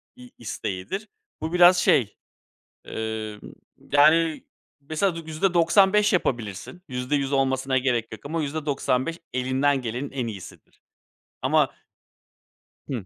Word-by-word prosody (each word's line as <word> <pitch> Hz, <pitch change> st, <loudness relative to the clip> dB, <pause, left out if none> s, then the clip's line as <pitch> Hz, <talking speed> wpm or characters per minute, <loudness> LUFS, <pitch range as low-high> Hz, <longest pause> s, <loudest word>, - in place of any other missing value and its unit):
iii, 250 Hz, -1 st, -14 dB
isteğidir. 115 Hz, -, -5 dB, 0.3 s
Bu 160 Hz, +2 st, -3 dB
biraz 180 Hz, 0 st, +7 dB
şey 125 Hz, -, +2 dB, 0.7 s
emm, 110 Hz, -1 st, -5 dB, 0.5 s
yani, 155 Hz, +2 st, +4 dB, 0.4 s
mesela, 155 Hz, +6 st, -1 dB
y 165 Hz, -, -7 dB
yüzde 160 Hz, +4 st, 0 dB
doksan 185 Hz, +3 st, +4 dB
beş 210 Hz, 0 st, +3 dB
yapabilirsin. 120 Hz, -, -2 dB
%100 135 Hz, +2 st, -1 dB
olmasına 130 Hz, -1 st, +1 dB
gerek 120 Hz, -4 st, 0 dB
yok 110 Hz, -, -9 dB
ama 160 Hz, +3 st, -2 dB
%95 145 Hz, 0 st, -1 dB
elinden 130 Hz, +2 st, +1 dB
gelenin 125 Hz, +4 st, -4 dB
en 130 Hz, -4 st, -3 dB
iyisidir. 100 Hz, -5 st, -10 dB, 0.6 s
Ama -, -, +2 dB, 1.2 s
Hımm. 120 Hz, -8 st, -4 dB
140 Hz, 115 wpm, -24 LUFS, 125-165 Hz, 1.2 s, biraz